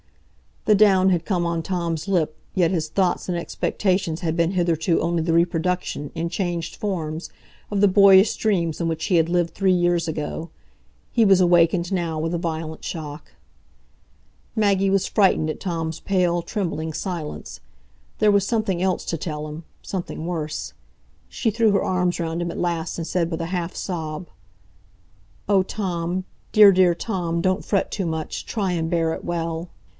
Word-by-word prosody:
The 215 - +5
down 195 -2 +5
had 175 -3 +1
come 180 -4 0
on 170 -1 -1
Tom's 170 -1 -2
lip, 165 -5 +1 0.2
yet 180 -3 +2
his 165 -4 -1
thoughts 180 +1 0
and 175 - 0
expectations 180 0 -1
had 165 -2 -1
been 170 0 +2
hitherto 170 -2 +1
only 170 -1 0
the 165 +1 0
reproduction, 170 -3 0
in 165 +1 -2
changed 170 -2 -3
forms, 165 -5 -4 0.4
of 200 -1 0
the 205 - +7
boyish 195 +1 +6
dreams 175 -7 0
in 170 - 0
which 160 -1 -2
he 185 - +1
had 165 -1 +4
lived 175 -1 +1
three 195 -1 +2
years 175 -1 +2
ago. 160 +1 -4 0.6
He 230 -2 +3
was 195 -2 +6
awakened 175 0 +3
now 170 -4 -1
with 165 +2 -2
a - - +1
violent 160 -2 -4
shock. 150 -2 -7 1.2
Maggie 200 -3 +2
was 195 -1 +2
frightened 190 -6 +3
at 155 - -4
Tom's 165 -3 -3
pale, 180 -3 +1
trembling 165 -5 -3
silence. 170 -3 -5 0.6
There 215 -1 +5
was 200 -1 +3
something 210 -6 0
else 190 -1 0
to 165 - -2
tell 150 -1 -4
him,—something 160 +2 -7
worse. 160 -3 -4 0.5
She 230 - -1
threw 225 0 +3
her 200 - +2
arms 180 -1 0
round 165 0 -2
him 170 0 -2
at - - -6
last, 170 -1 -2
and 165 - -3
said, 170 -1 0
with 165 0 -3
a 165 - -3
half 175 -1 -3
sob: 160 -2 -4 1.2
"Oh, 195 -2 +4
Tom—dear, 185 +2 +2
dear 180 -2 +4
Tom, 170 -4 -2
don't 185 +2 0
fret 200 - 0
too 195 - -2
much; 160 -1 -4
try 200 -5 -1
and 165 -2 -1
bear 165 -1 +1
it - - -7
well." 165 0 -3
175 Hz, 170 wpm, -23 LUFS, 165-190 Hz, 1.2 s, the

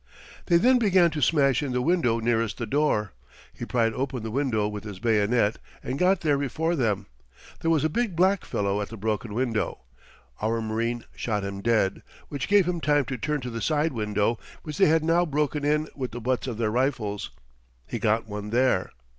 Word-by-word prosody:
They 170 - +5
then 250 +8 +4
began 185 -6 +4
to 150 -1 -3
smash 140 -2 +3
in 140 -4 -3
the 125 - +1
window 150 -9 +2
nearest 115 -1 0
the 120 - -3
door. 110 -5 +1 0.4
He - - -6
pried 115 -2 +1
open 130 -2 -3
the 110 - -4
window 120 -5 0
with 105 -1 -6
his 105 -3 -7
bayonet, 110 +1 +2 0.3
and 130 +2 -3
got 185 +1 +3
there 145 -3 +2
before 160 +5 -1
them. 105 - 0 0.5
There 165 - -1
was 160 -3 +3
a - - +4
big 210 +3 -1
black 190 +3 +3
fellow 100 0 -1
at 100 - -4
the 115 - -8
broken 105 0 -2
window. 115 - -1 0.6
Our 115 +2 0
marine 115 +1 -2
shot 105 -4 -2
him 100 0 -5
dead, 110 -4 +1 0.3
which 140 -1 -4
gave 200 -3 +4
him 175 -2 -1
time 145 -2 +2
to 130 - -4
turn 150 +6 -1
to 125 -1 -5
the 115 0 -5
side 155 +2 +1
window, 105 0 0 0.2
which 150 -2 -6
they 190 - +6
had 160 0 +3
now 170 +2 +3
broken 150 -2 -1
in 150 +1 +1
with 130 -5 -4
the 120 - -5
butts 125 +2 -1
of 120 -4 -4
their 110 -2 0
rifles. 120 -5 -1 0.6
He - - -5
got 110 +1 +1
one 105 0 -6
there. 120 -5 +2
125 Hz, 205 wpm, -26 LUFS, 110-150 Hz, 0.6 s, they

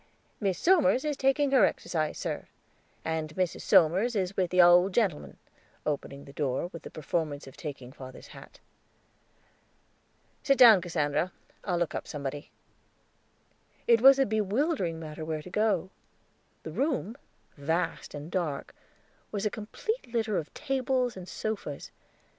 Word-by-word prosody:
"Miss 195 -4 0
Somers 310 -6 +3
is 300 -1 0
taking 270 +1 +2
her 265 - +5
exercise, 155 -3 0
sir, - - -4 0.6
and 160 -1 -3
Mrs. 185 -2 -1
Somers 190 +9 +4
is 190 -1 -1
with 185 -2 +1
the 180 - 0
owld 180 +2 +6
gentleman"; 195 -11 0 0.5
opening 140 -2 -3
the 140 - -13
door, 140 +3 -1
with 165 - -8
the - - -9
performance 155 -1 -3
of 135 0 -12
taking 140 -4 -7
father's 130 -2 -11
hat. - - -13 1.8
"Sit 275 -1 +3
down, 225 -7 +9
Cassandra. 170 0 -1 0.3
I'll 180 -3 -1
look 175 -1 -1
up - - -5
somebody." 145 0 -5 1.4
It 230 -1 +5
was 270 +1 +8
a 270 - +3
bewildering 215 - 0
matter 155 -1 -7
where 155 -1 -3
to 180 - -11
go; 200 -4 +1 0.7
the - - -6
room, 265 -6 -1 0.4
vast 160 +3 -2
and 145 +3 -8
dark, 160 -7 -2 0.6
was 205 0 -3
a 210 - +1
complete 245 - -4
litter 220 -3 0
of 155 - -8
tables 260 -3 0
and 185 -1 -9
sofas. 205 -10 -5
180 Hz, 140 wpm, -29 LUFS, 155-235 Hz, 1.8 s, down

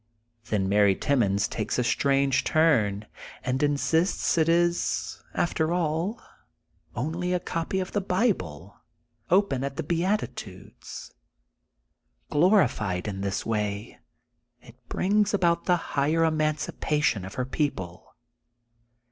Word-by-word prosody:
Then 105 -4 0
Mary 100 0 +4
Timmons 100 -8 +1
takes 110 - -3
a 125 - +2
strange 135 +2 +2
torn, 110 -11 +2 0.4
and 130 0 -1
insists 155 +5 +1
it 165 -1 +2
is, 175 +1 0
after 160 -1 0
all, 175 +5 -1 0.8
only 165 +8 -2
a 180 - +1
copy 170 +2 -2
of 185 - -4
the 205 - 0
Bible, 100 - -1 0.5
open 180 -8 +2
at 140 0 -4
the 165 - -2
Beatitudes. 165 - -4 1.2
Glorified 130 - +2
in 95 -2 -4
this 100 -1 -2
way 105 -2 -3 0.6
it - - -16 0.2
brings 205 +2 +2
about 170 -3 +1
the 180 -1 +3 0.2
higher 150 +4 +2
emancipa 155 -1 0
tion 115 -9 +1
of 95 +1 -8
her 125 - -1
people. 100 - -4
145 Hz, 115 wpm, -26 LUFS, 105-170 Hz, 1.2 s, Mary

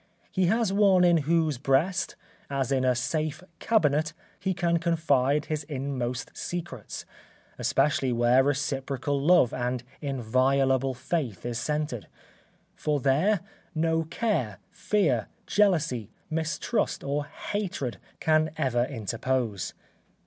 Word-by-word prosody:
He 185 -2 +2
has 220 0 +2
one 195 -3 +5
in 175 -1 +5
whose 160 -5 +2
breast, 150 +8 +1 0.3
as 140 -2 -1
in 130 -1 +2
a 130 -1 +3
safe 155 +6 -2 0.2
cabinet, 155 -7 +2 0.3
he 190 -1 -1
can 170 -1 +1
confide 150 -4 +2
his 155 -1 -2
inmost 130 -4 -3
secrets, 175 -1 -5 0.5
especially 135 -3 +2
where 120 +2 +4
reciprocal 140 0 -1
love 150 -5 +5
and 125 0 -2 0.2
inviolable 135 0 +1
faith 130 - -3
is 120 -1 -2
centred; 150 -4 -2 0.7
for 150 -1 0
there 155 +9 +2 0.3
no 160 +1 +2
care, 160 - -1
fear, 155 - +1 0.2
jealousy, 160 - +2 0.2
mistrust 160 +8 -1
or 145 +1 -1
hatred 185 - -4 0.2
can 155 0 +3
ever 120 -2 +1
interpose. 115 -3 -2
145 Hz, 110 wpm, -27 LUFS, 130-165 Hz, 0.7 s, one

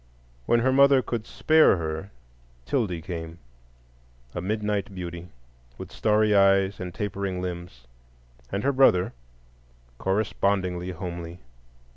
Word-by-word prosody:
When 120 - +3
her 130 +2 +2
mother 140 -1 +5
could 115 -2 -4
spare 155 -10 +4
her, 80 +3 -4 0.6
'Tildy 95 - -1
came,—a - - -11
midnight 105 0 -2
beauty, 85 -1 -7 0.5
with - - -9
starry 105 0 +2
eyes 100 0 +4
and 90 -1 -5
tapering 100 -1 -3
limbs; 85 -8 -6 0.7
and 100 +1 -2
her 140 - +2
brother, 130 -9 +4 0.9
correspondingly 95 -2 0
homely. 85 -1 -6
90 Hz, 105 wpm, -25 LUFS, 85-105 Hz, 0.9 s, mother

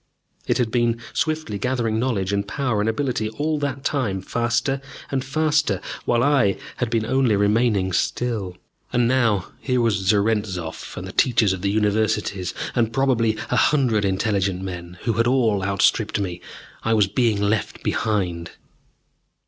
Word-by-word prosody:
It - - +2
had 120 -3 0
been 120 -1 +1
swiftly 155 -10 -1
gathering 115 -2 0
knowledge 105 -6 -1
and 100 0 -1
power 125 -3 -1
and 110 - +1
ability 120 -2 -1
all 150 +7 -1
that 140 -2 -3
time, 125 -11 -1
faster 120 +6 -1 0.3
and 135 -2 0
faster, 150 - +1 0.3
while 120 0 +2
I 135 -9 +3 0.2
had 125 - -1
been 115 -1 0
only 130 -3 +2
remaining 100 -2 +2
still. 100 -2 -1 0.3
And 120 -1 +2
now 115 -7 +1
here 125 -2 0
was 115 -3 +2
Zarentzov 100 -5 0
and - - -5
the - - -7
teachers 115 -6 +3
of 95 - -5
the 100 - 0
Universities, 105 -3 0 0.2
and, 115 -2 +1
probably, 120 -4 +2 0.2
a - - +2
hundred 120 -4 +3
intelligent 95 -1 0
men, 90 -1 -7
who 115 - +1
had 115 +2 +1
all 115 -6 +2
outstripped 100 +3 +1
me! 90 -3 -4 0.4
I 110 0 +1
was 105 -2 +4
being 110 +1 +1
left 105 +1 -1
behind. 90 -6 -1
110 Hz, 155 wpm, -22 LUFS, 100-125 Hz, 0.4 s, was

